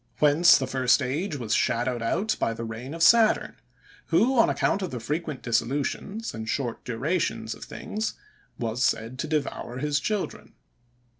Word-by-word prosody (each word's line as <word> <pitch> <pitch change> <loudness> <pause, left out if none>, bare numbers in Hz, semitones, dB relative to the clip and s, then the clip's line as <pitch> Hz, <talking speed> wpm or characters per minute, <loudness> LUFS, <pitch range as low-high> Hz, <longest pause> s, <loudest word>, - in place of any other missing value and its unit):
Whence 150 +3 +6
the 135 - -1
first 130 -1 +3
age 155 +7 -2
was 115 -6 -2
shadowed 120 0 +1
out 205 - 0
by 115 - 0
the 115 - -5
reign 115 +6 -6
of 165 - 0
Saturn; 225 +2 +4 0.5
who, 225 +11 +3
on - - +5
account 200 - +1
of 185 - -2
the 125 - -5
frequent 150 +4 -4
dissolutions, 140 - -2
and 110 0 -6
short 120 -5 -2
durations 135 +10 -1
of - - -10
things, 215 +1 -4 0.4
was 120 0 -2
said 115 +3 0
to 155 - -2
devour 145 -5 -3
his 150 +2 0
children. 210 +1 -4
140 Hz, 160 wpm, -26 LUFS, 120-170 Hz, 0.5 s, Whence